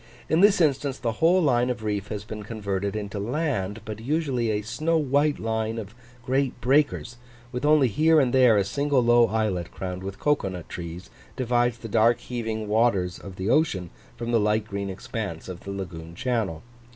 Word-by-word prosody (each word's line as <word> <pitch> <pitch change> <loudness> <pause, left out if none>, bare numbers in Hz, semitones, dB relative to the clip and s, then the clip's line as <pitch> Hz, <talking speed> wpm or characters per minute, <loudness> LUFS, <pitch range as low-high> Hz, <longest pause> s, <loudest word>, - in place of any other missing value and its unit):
In 160 - +3
this 205 -1 +6
instance 140 -4 +1
the 115 - -1
whole 175 +3 +5
line 125 -4 +3
of 120 -3 -3
reef 105 -1 -2
has 105 -2 -5
been 105 0 -7
converted 100 -2 -3
into 105 -1 -4
land; 115 - -2
but 110 -1 -6
usually 130 -2 0
a 105 -1 -1
snow 155 +10 0
white 145 0 +2
line 110 0 -2
of 105 -2 -6 0.3
great 135 +1 0
breakers, 135 -2 +1 0.3
with 125 +3 -3
only 150 -3 +5
here 155 +8 +4
and 130 -4 +2
there 125 -5 +6
a 100 - +3
single 140 +5 +1
low 120 0 +5
islet 100 -6 -1
crowned 90 0 -5
with 95 +1 -6
cocoa 145 -9 +1
nut 90 -3 -7
trees, 85 +1 -7 0.2
divides 120 -1 +1
the 115 - -8
dark 115 +2 +4
heaving 110 -3 -4
waters 105 -5 +1
of 95 -2 -10
the 95 +4 -1
ocean 95 - +1 0.3
from 120 0 -3
the 115 - +4
light 105 0 +1
green 100 -1 -4
expanse 95 -2 -5
of 90 -1 -8
the 100 - -5
lagoon 85 -4 -7
channel. 110 -9 -2
115 Hz, 190 wpm, -25 LUFS, 100-130 Hz, 0.3 s, this